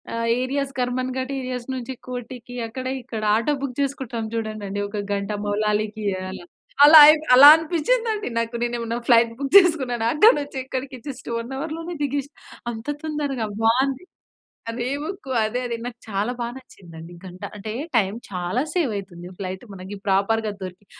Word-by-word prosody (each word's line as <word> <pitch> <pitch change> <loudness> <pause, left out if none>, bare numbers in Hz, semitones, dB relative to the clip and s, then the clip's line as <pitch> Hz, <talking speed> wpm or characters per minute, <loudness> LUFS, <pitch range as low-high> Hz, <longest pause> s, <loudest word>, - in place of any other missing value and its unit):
ఆహ్, 230 0 -1
areas, 275 +1 -2
Karmanghat 255 +1 -2
areas 250 -2 -5
నుంచి 255 0 -5
కోటికి, 245 0 -7
అక్కడ 255 +3 -7 0.2
ఇక్కడ 230 -3 -6
ఆటో 230 +7 +1
బుక్ 265 -3 -4
జేసుకుంటాం 265 -5 -2
చూడండండి. 215 -3 -4
ఒక 205 0 -5
గంట 200 +1 -2
మౌలాలికి 210 +1 -1 0.3
అలా. 180 -2 -8 0.4
అలా 310 +1 +10
ఐప్ 310 0 +4
అలా 280 +3 +10
అనిపించిందండి 420 +7 0
నాకు 230 +1 -1
నేనేమన్నా 235 -1 -2
ఫ్లైట్ 230 -1 +5
బుక్ 275 -1 -4
చేసుకున్నానా 265 - +3
అక్కడ 425 +10 +7
నుంచి 285 -1 -6
ఇక్కడికి 260 0 -5
జస్ట్ 270 -2 -8
వన్ 230 +2 -5
హవర్‌లోనే 325 +4 -5
దిగేశ్నా. 285 0 -2 0.4
అంత 225 -1 -8 0.2
తొందరగా 290 -6 -2 0.2
బావుంది. 260 +7 +2 0.7
అదే 240 +2 -3
బుక్కు 315 -5 -6
అదే, 245 +4 -2
అదే. 235 -1 -3
నాకు 245 -1 -7
చాలా 205 +3 -1
బాగా 235 0 -3
నచ్చిందండి 170 -9 -13
గంట 185 0 -11 0.2
అంటే 210 +1 -6 0.3
టైమ్ 200 0 +1
చాలా 180 +6 -1
సేవ్ 330 -10 +1
అయితుంది 175 -3 -8
ఫ్లైట్ 190 +3 -5
మనకి 190 +2 -8
ప్రాపర్‌గా 210 +3 +1
దొరికి 185 +2 -9
245 Hz, 150 wpm, -23 LUFS, 215-275 Hz, 0.7 s, అలా